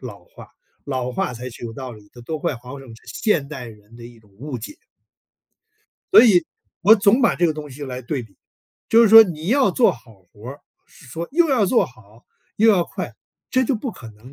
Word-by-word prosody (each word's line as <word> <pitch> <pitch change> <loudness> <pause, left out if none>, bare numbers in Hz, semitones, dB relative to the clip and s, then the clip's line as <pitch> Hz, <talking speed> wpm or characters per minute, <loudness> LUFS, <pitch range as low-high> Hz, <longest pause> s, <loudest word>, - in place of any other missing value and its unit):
老 - - -10
话， - - -15 0.4
老 130 -2 -3
话 125 - -3
才 125 +2 -8
是 120 - -14
有 115 - -6
道 130 +1 -8
理 105 -2 -16
的。 120 - -14
“多 155 +5 -4
快 150 -3 -3
好 125 +4 -11
省” 135 - -14
是 - - -22
现 170 -11 -1
代 130 -5 -8
人 105 0 -16
的 120 - -12
一 120 -1 -14
种 105 -2 -25
误 130 +6 -7
解。 115 - -10 1.4
所 - - +10
以 180 -9 +4 0.3
我 205 +6 +7
总 205 +3 +3
把 235 - +3
这 175 - 0
个 165 - +2
东 150 -1 -8
西 145 +2 -11
来 130 -2 -6
对 130 +1 -4
比， 110 -4 -18 0.5
就 230 +1 +5
是 230 - +4
说 225 +1 +10
你 165 -3 -6
要 265 +3 +2
做 245 - +3
好 115 -5 -14
活 105 +4 -12
儿， 140 +2 -9 0.3
是 150 - -19
说 165 +7 -7
又 335 +2 +3
要 250 -8 +2
做 235 - +2
好 110 -1 -18 0.3
又 220 +2 +4
要 185 -5 +2
快， - - -7 0.4
这 260 0 +2
就 260 - 0
不 240 +3 -4
可 120 - -12
能， 110 +6 -17
140 Hz, 245 characters per minute, -21 LUFS, -, 1.4 s, 所